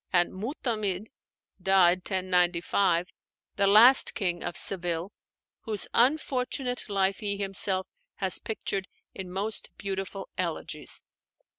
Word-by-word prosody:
and 175 Hz, -2 st, +2 dB
Mu'tamid 215 Hz, -, -3 dB, 0.5 s
(died 185 Hz, -1 st, +4 dB
1095), 180 Hz, -1 st, +1 dB, 0.5 s
the 200 Hz, -, +2 dB
last 230 Hz, +7 st, +7 dB
King 175 Hz, -5 st, -1 dB
of 175 Hz, -, -5 dB
Seville, 175 Hz, 0 st, 0 dB, 0.5 s
whose 215 Hz, -3 st, +1 dB
unfortunate 250 Hz, -2 st, 0 dB
life 195 Hz, -1 st, +1 dB
he 200 Hz, -1 st, -2 dB
himself 195 Hz, -1 st, +1 dB, 0.3 s
has 190 Hz, -2 st, -2 dB
pictured 200 Hz, -3 st, -3 dB, 0.3 s
in 190 Hz, -2 st, -7 dB
most 200 Hz, +4 st, -3 dB
beautiful 195 Hz, 0 st, -5 dB
elegies. -, -, -3 dB
195 Hz, 105 wpm, -28 LUFS, 185-215 Hz, 0.5 s, last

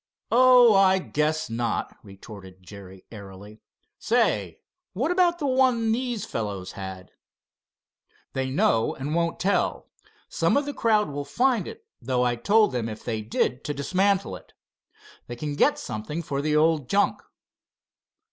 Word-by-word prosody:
"Oh, 250 Hz, -1 st, +6 dB
I 190 Hz, -1 st, +5 dB
guess 155 Hz, -3 st, -1 dB
not," 115 Hz, 0 st, -3 dB
retorted 95 Hz, -2 st, -13 dB
Jerry 95 Hz, -1 st, -13 dB
airily. 100 Hz, 0 st, -12 dB, 0.4 s
"Say, -, -, 0 dB, 0.3 s
what 260 Hz, -, -1 dB
about 360 Hz, -1 st, +2 dB
the 305 Hz, -, -4 dB
one 255 Hz, -4 st, +2 dB
these 240 Hz, -1 st, -2 dB
fellows 100 Hz, -4 st, -5 dB
had?" 95 Hz, -1 st, -9 dB, 1.2 s
"They 130 Hz, 0 st, -2 dB
know 115 Hz, -4 st, +1 dB
and 140 Hz, +3 st, -5 dB
won't 170 Hz, 0 st, -1 dB
tell. 200 Hz, +2 st, -1 dB, 0.4 s
Some -, -, +1 dB
of 285 Hz, 0 st, -2 dB
crowd 215 Hz, -7 st, +1 dB
will 145 Hz, 0 st, -4 dB
find 235 Hz, -, 0 dB
it, -, -, -10 dB, 0.2 s
though 125 Hz, 0 st, 0 dB
I 120 Hz, -1 st, +1 dB
told 210 Hz, -, +3 dB
them 120 Hz, -3 st, -3 dB
if 110 Hz, 0 st, -9 dB
they 110 Hz, -2 st, -3 dB
did 120 Hz, +3 st, -1 dB
to 150 Hz, -, -3 dB
dismantle 190 Hz, +7 st, 0 dB
it. -, -, -21 dB, 0.7 s
They 120 Hz, -, -6 dB
can 145 Hz, +4 st, -4 dB
get -, -, +3 dB
something 130 Hz, +11 st, -5 dB
for 140 Hz, -2 st, -3 dB
the 150 Hz, +1 st, 0 dB
old 155 Hz, -3 st, +2 dB
junk." 205 Hz, +1 st, +1 dB
150 Hz, 145 wpm, -25 LUFS, -, 1.2 s, Oh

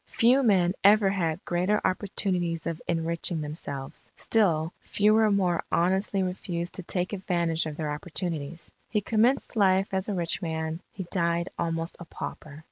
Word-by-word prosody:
Few 250 Hz, +4 st, +4 dB
men 185 Hz, -7 st, +3 dB
ever 205 Hz, 0 st, +6 dB
had 170 Hz, -3 st, -1 dB
greater 180 Hz, +5 st, +1 dB
opportunities 180 Hz, -4 st, 0 dB
of 165 Hz, -1 st, -3 dB
enriching 165 Hz, 0 st, -1 dB
themselves; 145 Hz, -3 st, -6 dB
still 170 Hz, -7 st, +1 dB
fewer 215 Hz, +1 st, +3 dB
more 185 Hz, -4 st, +2 dB
honestly 190 Hz, +3 st, +2 dB
refused 180 Hz, -1 st, -3 dB
to -, -, -5 dB
take 180 Hz, +2 st, -2 dB
advantage 170 Hz, -4 st, 0 dB
of 150 Hz, -1 st, -6 dB
their 155 Hz, -2 st, -2 dB
opportunities. 165 Hz, 0 st, -4 dB, 0.2 s
He 215 Hz, -, +1 dB
commenced 235 Hz, +6 st, +1 dB
life 195 Hz, -2 st, +3 dB
as 190 Hz, +2 st, -1 dB
a 205 Hz, -, -1 dB
rich 170 Hz, +1 st, -1 dB
man, 160 Hz, -1 st, -3 dB
he 190 Hz, -, -6 dB
died 170 Hz, -1 st, +1 dB
almost 165 Hz, 0 st, -2 dB
a 175 Hz, -, -8 dB
pauper.... 150 Hz, -2 st, -7 dB
175 Hz, 150 wpm, -27 LUFS, 165-195 Hz, 0.2 s, ever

